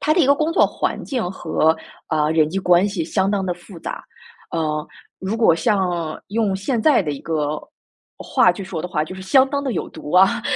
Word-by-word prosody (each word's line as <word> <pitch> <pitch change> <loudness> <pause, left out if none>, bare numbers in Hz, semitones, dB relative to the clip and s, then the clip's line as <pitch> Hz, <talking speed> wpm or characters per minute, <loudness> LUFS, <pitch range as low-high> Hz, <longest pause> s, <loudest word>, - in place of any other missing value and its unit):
它 305 - +2
的 355 - +3
一 275 - +4
个 280 - +6
工 310 +2 0
作 - - +5
环 - - -3
境 240 -10 -2
和， 160 -3 +1 0.3
啊， 150 -1 +1
人 155 -1 +3
际 195 - -1
关 180 +1 +4
系 190 -5 -3
相 190 +4 0
当 200 -2 0
地 180 - -1
复 175 +1 -13
杂， - - -6 0.5
呃， 155 -2 -1 0.4
如 195 +4 -2
果 220 -8 +5
像 175 -4 -1
用 210 -1 0
现 225 +5 -1
在 295 -1 +5
的 150 -4 -2
一 140 - -7
个 150 -2 -2 0.6
话 - - +3
去 190 +2 -7
说 175 -4 -5
的 180 - -4
话， 155 -4 -1
就 170 - -8
是 190 - -9
相 265 +8 +4
当 280 0 -2
地 265 -3 -2
有 - - -3
毒 155 -2 -9
啊， 195 +6 +4
185 Hz, 240 characters per minute, -21 LUFS, 160-220 Hz, 0.6 s, 个